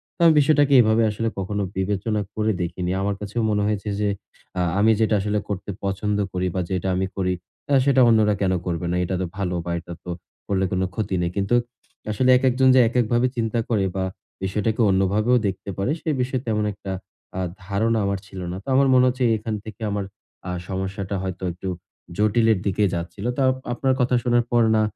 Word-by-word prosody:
তো -, -, -56 dB
আমি 160 Hz, -, +6 dB
বিষয়টাকে 145 Hz, -1 st, +4 dB
এভাবে 110 Hz, +1 st, +3 dB
আসলে 115 Hz, +2 st, -2 dB
কখনো 100 Hz, +2 st, -2 dB
বিবেচনা 105 Hz, +3 st, -1 dB
করে 110 Hz, 0 st, +1 dB
দেখিনি। 90 Hz, +1 st, -2 dB
আমার 100 Hz, +1 st, 0 dB
কাছে 105 Hz, +1 st, -7 dB
মনে 105 Hz, -1 st, +1 dB
হয়েছে 105 Hz, 0 st, -2 dB
যে 105 Hz, -, +1 dB, 0.5 s
আ -, -, +2 dB, 0.2 s
আমি 110 Hz, +2 st, +5 dB
যেটা 110 Hz, -1 st, +3 dB
আসলে 105 Hz, +1 st, 0 dB
করতে 100 Hz, 0 st, -4 dB
পছন্দ 100 Hz, +1 st, -1 dB, 0.2 s
করি 90 Hz, 0 st, 0 dB
বা 90 Hz, -, +1 dB
যেটা 95 Hz, 0 st, -1 dB
আমি 95 Hz, +1 st, 0 dB
করি 90 Hz, -1 st, 0 dB, 0.4 s
আ -, -, +5 dB
সেটা 135 Hz, -2 st, +4 dB
অন্যরা 110 Hz, -2 st, +4 dB
কেনো 95 Hz, -2 st, +2 dB
করবে 90 Hz, -1 st, -2 dB
না? -, -, 0 dB
এটা 95 Hz, +1 st, -2 dB
তো -, -, 0 dB
ভালো 90 Hz, -3 st, -1 dB
বা 85 Hz, -, -3 dB
এটা 85 Hz, +1 st, -9 dB
তো -, -, -9 dB, 0.4 s
করলে 95 Hz, -1 st, +1 dB
কোনো 95 Hz, 0 st, +1 dB
ক্ষতি 105 Hz, -3 st, -1 dB
নেই। 85 Hz, 0 st, -1 dB
কিন্তু 100 Hz, +4 st, +1 dB, 0.6 s
আসলে 125 Hz, +5 st, +1 dB
একেকজন 130 Hz, 0 st, +3 dB
যে -, -, +7 dB
একেকভাবে 120 Hz, +1 st, +2 dB
চিন্তা 115 Hz, 0 st, 0 dB
করে 105 Hz, -5 st, +2 dB
বা 95 Hz, -, 0 dB, 0.4 s
বিষয়টাকে 105 Hz, +4 st, 0 dB
অন্যভাবেও 100 Hz, +6 st, +3 dB
দেখতে 95 Hz, +1 st, -5 dB
পারে 100 Hz, +8 st, 0 dB
সে -, -, -3 dB
বিষয়ে 130 Hz, 0 st, -1 dB
তেমন 105 Hz, -1 st, +1 dB
একটা 100 Hz, 0 st, -7 dB, 0.5 s
আ -, -, -1 dB, 0.3 s
ধারণা 110 Hz, +4 st, +1 dB
আমার 100 Hz, -1 st, -1 dB
ছিল 95 Hz, -, -9 dB
না। 90 Hz, -, -4 dB
তো -, -, -27 dB
আমার 135 Hz, 0 st, +5 dB
মনে 130 Hz, 0 st, +6 dB
হচ্ছে 125 Hz, +1 st, 0 dB
এখান 110 Hz, 0 st, -3 dB
থেকে 110 Hz, 0 st, -10 dB
আমার 100 Hz, -1 st, -2 dB, 0.4 s
আ -, -, -2 dB, 0.2 s
সমস্যাটা 95 Hz, +1 st, -3 dB
হয়তো 95 Hz, 0 st, -5 dB
একটু 90 Hz, +3 st, -8 dB, 0.5 s
জটিলের 110 Hz, 0 st, +3 dB
দিকে 100 Hz, +1 st, +1 dB
যাচ্ছিলো। 90 Hz, +6 st, -3 dB
তার 130 Hz, -1 st, +4 dB, 0.2 s
আপনার 130 Hz, +2 st, +1 dB
কথা 125 Hz, 0 st, +2 dB
শোনার 120 Hz, -1 st, +3 dB
পর 120 Hz, -1 st, +4 dB
না 110 Hz, -, +3 dB
105 Hz, 195 wpm, -23 LUFS, 95-115 Hz, 0.6 s, যে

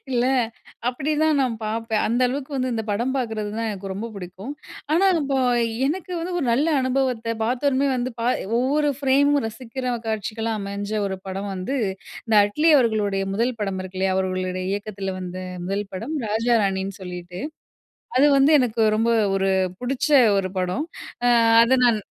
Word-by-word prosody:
இல்ல, 245 Hz, -1 st, +1 dB, 0.6 s
அப்டிதான் 300 Hz, +4 st, +1 dB
நான் 255 Hz, -3 st, +1 dB
பாப்பேன் 220 Hz, 0 st, -1 dB
அந்த 235 Hz, +3 st, 0 dB
அளவுக்கு 265 Hz, +3 st, -4 dB
வந்து 255 Hz, -1 st, -1 dB
இந்த 225 Hz, -1 st, -1 dB
படம் 235 Hz, +6 st, 0 dB
பாக்கறது 220 Hz, -5 st, -2 dB
தான் 230 Hz, 0 st, -1 dB
எனக்கு 195 Hz, -1 st, -6 dB
ரொம்ப 210 Hz, +4 st, -4 dB
பிடிக்கும். 190 Hz, +6 st, -7 dB, 0.4 s
ஆனா 375 Hz, +5 st, +4 dB
இப்போ 275 Hz, -1 st, -1 dB, 0.5 s
எனக்கு 360 Hz, +5 st, -3 dB
வந்து 355 Hz, +2 st, -4 dB
ஒரு 320 Hz, -, -1 dB
நல்ல 275 Hz, +7 st, +2 dB
அனுபவத்த 255 Hz, -3 st, 0 dB
பாத்தோன 260 Hz, +3 st, +1 dB
வந்து, 250 Hz, +1 st, -2 dB
பா 235 Hz, -, -1 dB, 0.3 s
ஒவ்வொரு 290 Hz, +4 st, +2 dB
ஃப்ரேம் 280 Hz, +1 st, +3 dB
ரசிக்கிற 250 Hz, +2 st, -4 dB
காட்சிகள்லாம் 220 Hz, +1 st, -2 dB
அமைஞ்ச 200 Hz, +1 st, -5 dB, 0.2 s
ஒரு 190 Hz, -1 st, -4 dB
படம் 195 Hz, +1 st, -4 dB
வந்து, 190 Hz, +10 st, -3 dB, 0.5 s
இந்த 225 Hz, -2 st, 0 dB
அட்லி 300 Hz, +11 st, +2 dB
அவர்களுடைய 210 Hz, -5 st, +1 dB
முதல் 235 Hz, +2 st, 0 dB
படம் 195 Hz, -2 st, -2 dB
இருக்கில்லையா? 185 Hz, 0 st, -1 dB
அவர்களுடைய 185 Hz, -1 st, -2 dB
இயக்கதில 200 Hz, -2 st, -4 dB
வந்த 180 Hz, 0 st, -6 dB, 0.3 s
முதல் 200 Hz, +2 st, -2 dB
படம் 235 Hz, +12 st, -4 dB
ராஜா 230 Hz, +3 st, +2 dB
ராணின்னு, 195 Hz, 0 st, -1 dB
சொல்லிட்டு 180 Hz, -1 st, -7 dB, 0.8 s
அது 275 Hz, +3 st, +6 dB
வந்து 275 Hz, +2 st, +5 dB
எனக்கு 235 Hz, -3 st, +1 dB
ரொம்ப 225 Hz, +2 st, +2 dB, 0.3 s
ஒரு 195 Hz, 0 st, +1 dB, 0.3 s
புடிச்ச 265 Hz, +6 st, -1 dB, 0.3 s
ஒரு 185 Hz, -1 st, -1 dB
படம். 185 Hz, -, -1 dB, 0.4 s
அ -, -, +5 dB, 0.3 s
அத 240 Hz, +3 st, +4 dB
நான் 230 Hz, -3 st, +4 dB
225 Hz, 155 wpm, -23 LUFS, 195-260 Hz, 0.8 s, அது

